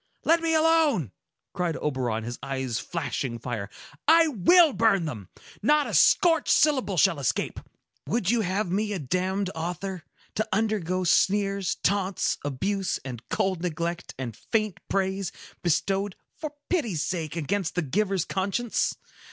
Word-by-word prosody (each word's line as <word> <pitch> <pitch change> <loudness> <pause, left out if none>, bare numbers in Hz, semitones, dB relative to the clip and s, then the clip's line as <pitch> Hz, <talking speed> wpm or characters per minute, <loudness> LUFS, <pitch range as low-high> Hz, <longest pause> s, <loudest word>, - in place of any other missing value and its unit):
"Let 330 +1 +4
me 325 -1 +1
alone!" 315 - +3 0.4
cried 175 -4 -1
Oberon, 125 -6 -1
his 120 +1 -6
eyes 130 -3 -2
flashing 135 -6 -3
fire. 115 -4 -5 0.4
"I 325 +1 +6
will 305 - +5
burn 210 -7 +3
them! 110 - -6 0.3
Not 295 +6 +3
a 225 - -5
scorched 325 - +4
syllable 260 -11 +3
shall 170 -2 +4
escape! 135 - -1 0.5
Would 220 -3 +1
you 240 -1 +2
have 190 -1 -1
me 210 +2 0
a - - -1
damned 185 +5 -1
author?—To 180 +5 -5
undergo 190 -4 0
sneers, 195 +1 +2
taunts, 195 -1 +1
abuse, 190 +8 -1
and 125 -4 -6
cold 190 -3 0
neglect, 170 0 -3
and 125 -4 -5
faint 215 - -1
praise, 190 -1 -1 0.3
bestowed, 195 +3 0 0.2
for 305 -2 -6
pity's 230 - 0
sake, 165 -2 -3
against 175 +2 -2
the 180 - +1
giver's 190 +4 0
conscience! 200 +5 -1
190 Hz, 135 wpm, -26 LUFS, 160-215 Hz, 0.5 s, I